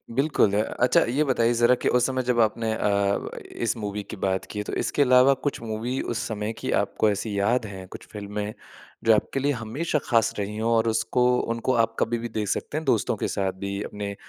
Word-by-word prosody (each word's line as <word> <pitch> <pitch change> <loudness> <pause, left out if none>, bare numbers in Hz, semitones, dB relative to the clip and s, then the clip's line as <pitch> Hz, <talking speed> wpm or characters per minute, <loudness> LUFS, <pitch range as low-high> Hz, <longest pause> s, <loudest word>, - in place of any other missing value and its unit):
बिल्कुल, 135 -7 +2
अ - - +3 0.2
अच्छा, 125 - +5
ये 140 +5 +2
बताइए 120 -4 +2
ज़रा 120 +1 +4
कि - - -2
उस 125 - +2
समय 130 -1 -1
जब 125 -1 +1
आपने 110 0 +1
अ, 100 -2 0 0.2
इस 115 -1 -1
मूवी 105 -1 -4
की - - -5
बात 95 0 -1
की 105 - -4
है। - - -1
तो - - -5
इसके - - 0
अलावा 130 0 +6
कुछ 145 - -2
मूवी 115 +3 -3
उस 120 - -3
समय 105 0 -3
की - - -3
आपको 110 - +1
ऐसी 100 0 -2
याद 115 +4 +2
हैं, 95 -3 -8
कुछ - - -11
फ़िल्में, 105 0 -5 0.5
जो 115 - +6
आपके 135 - -1
लिए 140 +2 +1
हमेशा 135 +7 -2
ख़ास 115 -2 +3
रही 105 +1 -3
हों 115 +1 0
और 115 0 +2
उसको 125 +2 +1
उनको 115 +2 -1
आप 115 0 -3
कभी 120 +1 +1
भी 120 +1 -5
देख 105 -2 -3
सकते 150 - -2
हैं, 160 - -3
दोस्तों 115 -6 +2
के - - -1
साथ 95 -1 -1
भी, 100 +1 -3
अपने 100 -1 -5
115 Hz, 225 wpm, -25 LUFS, 105-125 Hz, 0.5 s, अलावा